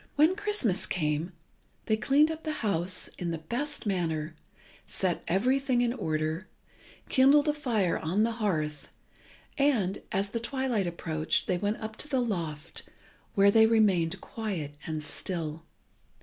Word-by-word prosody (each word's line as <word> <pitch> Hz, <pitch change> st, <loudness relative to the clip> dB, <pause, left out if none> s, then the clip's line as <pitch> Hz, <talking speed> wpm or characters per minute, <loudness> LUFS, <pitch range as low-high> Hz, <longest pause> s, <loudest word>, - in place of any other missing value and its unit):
When 310 Hz, +5 st, +5 dB
Christmas 410 Hz, -, 0 dB
came, 155 Hz, 0 st, -1 dB, 0.5 s
they 220 Hz, -, +2 dB
cleaned 285 Hz, +7 st, +3 dB
up 320 Hz, 0 st, -6 dB
the 310 Hz, -1 st, -3 dB
house 180 Hz, -2 st, +1 dB
in 175 Hz, -, -2 dB
the 165 Hz, -, -2 dB
best 245 Hz, -, -4 dB
manner, 160 Hz, -5 st, -1 dB, 0.5 s
set 185 Hz, -3 st, -1 dB
everything 255 Hz, +6 st, +2 dB
in 240 Hz, -1 st, +1 dB
order, 155 Hz, -3 st, -2 dB, 0.6 s
kindled 280 Hz, +3 st, +5 dB
a 300 Hz, -, +3 dB
fire 230 Hz, -, 0 dB
on 185 Hz, +7 st, +1 dB
the 230 Hz, -, +2 dB
hearth, 155 Hz, -7 st, -1 dB, 0.7 s
and, 230 Hz, -10 st, +2 dB
as 195 Hz, +1 st, 0 dB
the 230 Hz, -, -1 dB
twilight 240 Hz, -5 st, -1 dB
approached, 160 Hz, -2 st, -1 dB
they 180 Hz, -, 0 dB
went 205 Hz, +3 st, 0 dB
up 220 Hz, 0 st, -6 dB
to -, -, -5 dB
the 270 Hz, -3 st, +1 dB
loft, 170 Hz, -9 st, -3 dB, 0.5 s
where 200 Hz, 0 st, +6 dB
they 220 Hz, +1 st, +6 dB
remained 195 Hz, -8 st, +3 dB
quiet 190 Hz, -10 st, -4 dB
and 155 Hz, -1 st, -3 dB
still. 165 Hz, 0 st, -3 dB
200 Hz, 145 wpm, -29 LUFS, 165-250 Hz, 0.7 s, where